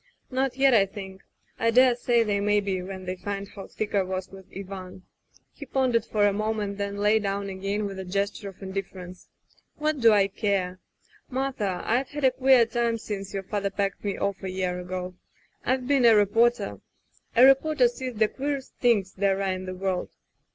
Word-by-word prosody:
"Not 260 0 -1
yet, 270 -1 +5
I 200 -4 +5
think. 190 -1 -9 0.4
I 230 - +2
dare 250 +1 +5
say 240 -1 +2
they 205 -2 0
may 205 +1 +2
be 195 -2 -2
when 190 0 -7
they 185 0 -3
find 200 +1 -5
how 195 - -10
thick 215 - -5
I 200 - +3
was 185 0 -4
with 190 -1 -13
Ivan 185 -1 -8 0.2
— - - -47
" - - -45
He 285 - -10
pondered 250 -4 +1
for 210 -2 +1
a 205 - +3
moment, 210 -1 -2
then 200 0 -3
lay 210 +2 +3
down 200 -1 -2
again 195 +2 -2
with 195 -1 -5
a - - -4
gesture 200 +2 -2
of 195 +1 -14
indifference, 190 -2 -7 0.5
"What 305 -1 -1
do 230 -2 +6
I 200 -2 +4
care!... 195 -3 -1 0.5
"Martha, 255 -8 -2
I've 250 +4 +1
had 295 -1 -6
a 260 - +5
queer 260 -2 +5
time 235 0 0
since 200 -3 -6
your 195 -1 -4
father 200 0 -2
packed 195 -1 -2
me 200 -2 -2
off 200 -1 -2
a 190 - -4
year 185 -1 -2
ago. 180 0 -5 0.5
I've 255 0 0
been 275 -3 +3
a 230 -1 +7
reporter. 225 +4 +2 0.6
A 245 - +8
reporter 270 -1 +5
sees 250 +1 -5
the 215 0 +3
queerest 275 +2 -4
things 210 -6 +2
there 195 0 +1
are 195 -1 0
in 185 0 -4
the 185 - -5
world. 185 -1 -2
205 Hz, 200 wpm, -26 LUFS, 190-240 Hz, 0.6 s, A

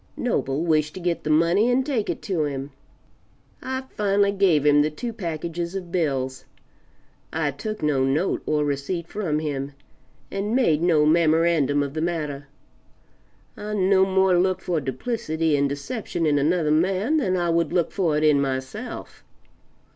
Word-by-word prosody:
Noble 135 +4 -1
wished 155 -2 +1
to - - -6
get 175 -1 -2
the 155 - -3
money 170 +9 +3
and 255 +1 +2
take 255 -8 -1
it - - -4
to 170 -6 0
him. 140 0 -5 0.9
I 260 0 -3
finally 200 -1 +2
gave 185 -7 +2
him 145 0 +5
the 150 - +2
two 230 +10 -6
packages 170 -1 -4
of 180 -3 -6
bills; 135 -7 -1 0.9
I 155 -2 -1
took 215 +8 -6
no 145 -3 +2
note 145 +8 0
or 150 -1 +1
receipt 145 +5 -3
from 175 -8 -2
him, 145 -2 -3 0.6
and 205 +4 -2
made 165 - +3
no 165 -4 +3
memorandum 160 -3 +3
of 140 -1 -5
the 155 - -3
matter. 150 -4 -3 1.1
I 210 0 -5
no 190 -1 +4
more 190 -1 +3
look 185 0 +1
for 170 -4 -2
duplicity 160 - -1
and 140 0 +1
deception 170 - -3
in 145 -2 +2
another 155 +1 +1
man 190 - +2
than 185 -11 +1
I 175 -1 0
would 170 0 +1
look 175 -2 +1
for 165 -6 0
it 155 - 0
in 150 -2 +4
myself. 135 - -5
165 Hz, 160 wpm, -24 LUFS, 150-190 Hz, 1.1 s, him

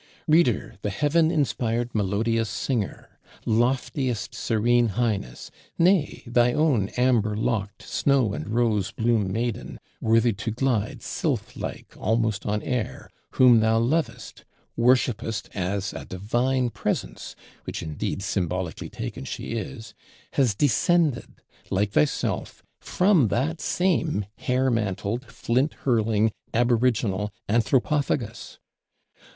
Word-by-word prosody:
"Reader, 155 - +2
the 105 - -1
heaven 150 - +2
inspired 120 -6 0
melodious 110 +2 0
Singer; 115 -1 -3 0.3
loftiest 120 0 0
Serene 120 +1 +2
Highness; 105 - -2 0.3
nay, 175 -1 +2
thy 120 0 +3
own 135 -10 +2
amber 115 -4 +2
locked, 110 -2 -2
snow 135 -7 +1
and 75 - -5
rose 110 -4 +1
bloom 110 -4 +1
Maiden, 115 +2 -3 0.2
worthy 115 +1 +3
to 100 +3 -4
glide 115 -2 -1
sylph - - -2
like - - -6
almost 110 -1 0
on 105 0 -1
air, 125 +1 -3 0.2
whom 125 -3 +6
thou 110 0 +3
lovest, 125 +2 -1 0.3
worshipest 120 -2 +1
as 100 +2 -2
a - - -6
divine 120 +6 0
Presence, - - -3 0.3
which, - - -5
indeed, 80 +5 -3
symbolically 90 -3 -2
taken, - - -6
she - - -6
is, 115 0 -6 0.4
has 125 -7 +2
descended, 145 - +2 0.4
like 100 +2 0
thyself, 75 -6 0 0.2
from 180 - +3
that 145 - -1
same 170 - 0
hair 130 +1 +1
mantled, 110 +2 -2
flint 125 +4 0
hurling 110 -3 +2 0.2
Aboriginal 115 -4 +1 0.2
Anthropophagus! 120 +2 0
115 Hz, 110 wpm, -25 LUFS, 105-130 Hz, 0.4 s, whom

